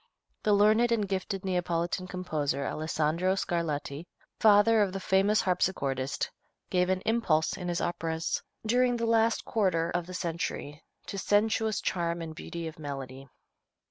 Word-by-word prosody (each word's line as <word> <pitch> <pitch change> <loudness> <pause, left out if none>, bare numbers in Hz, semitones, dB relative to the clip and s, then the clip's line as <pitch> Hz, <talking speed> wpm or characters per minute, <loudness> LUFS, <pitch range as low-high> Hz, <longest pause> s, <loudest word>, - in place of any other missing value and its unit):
The 210 - +3
learned 215 +4 +4
and 215 -3 +1
gifted 195 0 -3
Neapolitan 180 0 -1
composer, 155 -7 -2
Alessandro 160 +4 0
Scarlatti, 160 -3 -2 0.3
father 215 +1 +6
of 195 -2 +1
the 195 - -3
famous 195 +3 +3
harpsichordist, 140 -8 0 0.4
gave 180 0 +2
an 185 0 +1
impulse 175 -9 +2
in 180 - -6
his 175 -1 -1
operas, 165 -1 -2 0.2
during 245 +2 +3
the 230 - -1
last 225 0 +2
quarter 175 -6 +1
of 175 -1 -2
the 185 - -7
century, 165 -4 -4 0.2
to 195 - -5
sensuous 215 +2 +2
charm 170 -1 -1
and 160 -1 -6
beauty 170 +1 -6
of 160 0 -9
melody. 135 -2 -7
180 Hz, 140 wpm, -29 LUFS, 160-205 Hz, 0.4 s, father